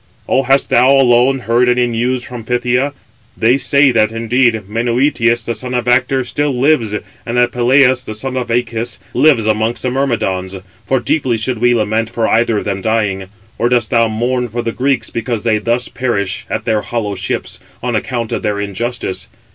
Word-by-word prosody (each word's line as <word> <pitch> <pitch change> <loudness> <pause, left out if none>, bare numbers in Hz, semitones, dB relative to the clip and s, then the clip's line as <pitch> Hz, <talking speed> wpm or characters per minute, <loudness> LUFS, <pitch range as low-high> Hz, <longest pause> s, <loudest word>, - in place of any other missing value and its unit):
Or 135 -1 +1
hast 135 +1 +2
thou 125 +2 +5
alone 130 0 +4
heard 120 +2 +2
any 125 0 +3
news 120 +2 -1
from 120 -2 -7
Phthia? 125 +4 0 0.4
They 120 +3 +3
say 140 0 +3
that, 110 -2 +2
indeed, 115 0 +1
Menœtius, 120 +1 +1
the 115 - -1
son 125 +1 -5
of 125 -1 -2
Actor, 130 +2 +2
still 135 +1 -1
lives, 130 -6 +2 0.3
and 120 +1 -3
that 120 0 +3
Peleus, 125 +1 +3
the 110 - -7
son 130 +4 -4
of 125 -2 -2
Æacus, 120 0 -2 0.2
lives 130 -4 +3
amongst 110 +2 0
the 125 - 0
Myrmidons: 100 -8 -1 0.3
for 135 - +2
deeply 125 -1 0
should 115 +1 -2
we 120 +1 +3
lament 110 0 0
for 115 -1 -1
either 115 -1 +2
of - - -3
them 100 -2 -2
dying. 105 -3 0 0.3
Or 120 - +2
dost 120 -3 +1
thou 115 -1 +3
mourn 120 +3 -1
for 120 +1 -4
the 115 - -2
Greeks, 135 +2 -1
because 115 -2 -3
they 110 -2 +2
thus 120 +3 -1
perish 120 -7 -2
at 110 - -3
their 110 -3 +1
hollow 110 -3 -3
ships, 95 -1 -4 0.2
on 125 -2 -1
account 115 0 -2
of - - -2
their 105 -1 -1
injustice? 100 +1 -4
120 Hz, 185 wpm, -15 LUFS, 110-125 Hz, 0.4 s, thou